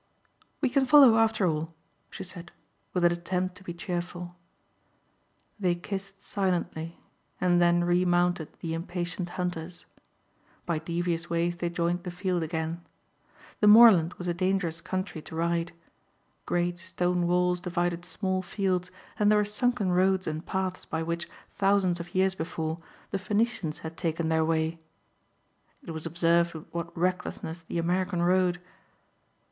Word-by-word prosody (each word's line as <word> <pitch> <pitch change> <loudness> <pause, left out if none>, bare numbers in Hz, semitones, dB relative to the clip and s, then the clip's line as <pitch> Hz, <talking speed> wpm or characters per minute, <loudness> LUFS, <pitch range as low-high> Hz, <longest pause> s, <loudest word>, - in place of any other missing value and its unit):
"We 270 - +2
can 270 0 +2
follow 270 -4 +8
after 220 -3 +3
all," 160 0 -1 0.3
she - - -7
said, 175 -2 -10 0.4
with 180 -1 +1
an 175 - +6
attempt 180 +2 -2
to 200 - -15
be 180 - -5
cheerful. 175 0 -5 1.2
They 180 -3 +2
kissed 195 +2 -6
silently 175 -4 -2 0.4
and 175 -1 +3
then 175 0 +4
remounted 175 -2 +2
the 165 -1 -3
impatient 175 +1 -4
hunters. 175 -1 -4 0.8
By 170 -3 0
devious 170 +1 -2
ways 170 +1 0
they 175 0 -1
joined 170 +1 -1
the 180 - -6
field 180 0 -1
again. 160 +1 -3 0.8
The 210 - +4
moorland 210 -6 +8
was 180 - -6
a 175 - +1
dangerous 180 -2 0
country 185 -3 -4
to 160 - -10
ride. 170 +1 0 0.8
Great 175 0 0
stone 180 -1 0
walls 180 0 +2
divided 175 -1 -1
small 185 +2 -2
fields 185 -1 -1 0.3
and 210 0 +4
there 210 - +5
were 210 - +3
sunken 210 -1 0
roads 185 +1 +3
and 155 +1 -3
paths 190 -1 -3
by 160 0 -3
which, 170 +1 -3 0.2
thousands 195 -3 +2
of 170 +2 -9
years 190 0 +3
before, 160 -2 -3 0.3
the 195 - -1
Phoenicians 205 -4 -1
had 160 0 -6
taken 165 -1 -1
their 160 0 +3
way. 160 0 0 1.0
It - - -7
was 160 0 -4
observed 170 +1 +2
with 155 - -8
what 170 0 -5
recklessness 175 -1 -2
the 165 - -5
American 180 +1 0
rode. 180 0 +3
175 Hz, 145 wpm, -28 LUFS, 170-185 Hz, 1.2 s, follow